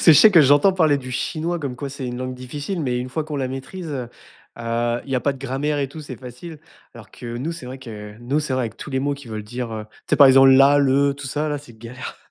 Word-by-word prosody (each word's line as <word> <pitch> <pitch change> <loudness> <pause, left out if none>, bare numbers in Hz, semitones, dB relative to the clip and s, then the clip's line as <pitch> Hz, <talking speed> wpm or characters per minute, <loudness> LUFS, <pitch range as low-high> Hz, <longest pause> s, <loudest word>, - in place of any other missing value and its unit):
C'est 165 - +8
je - - +7
sais 220 - +8
que 175 -5 +7
j'entends 145 +7 +5
parler 155 -6 +3
du 130 -1 -8
chinois 165 +6 -2
comme 140 -5 -4
quoi 140 +2 -5
c'est 135 -1 -6
une 120 0 -4
langue 130 0 -4
difficile, 145 +8 -5
mais 125 -5 -1
une 125 - -4
fois 155 +4 -3
que 155 - -9
on - - -1
la 130 -2 -1
maîtrise, 145 +7 -7
heu 130 -5 -4 0.5
heu, 120 +1 -1
il 135 - -7
y 130 - +3
pas 140 - +1
de 135 - -12
grammaire 140 +3 -2
et 140 - -1
tout, 155 +3 -9
c'est 140 -5 -8
facile. 130 +6 -10 0.4
Alors 115 -2 -13
que 120 -1 -7
nous, 135 +7 -3
c'est 165 -7 -8
vrai 130 +1 -7
que 105 -5 -9
nous, 135 +5 0
c'est 150 -3 -3
vrai 125 -3 0
que - - -12
avec - - -23
tous 150 - -8
les 130 - 0
mots 145 +1 0
qui 140 -2 -12
veulent 110 -1 -5
dire, 120 +1 -5
heu 110 -1 -5 0.2
tu - - -11
sais, - - +5
par 140 - +9
exemple, 135 0 +7
la, 135 +2 +6
le, 140 0 +3
tout 140 0 -8
ça 150 +3 -2
là, 145 - -2
c'est 120 -5 -15
galère. 120 +3 -8
135 Hz, 295 wpm, -22 LUFS, 125-145 Hz, 0.5 s, par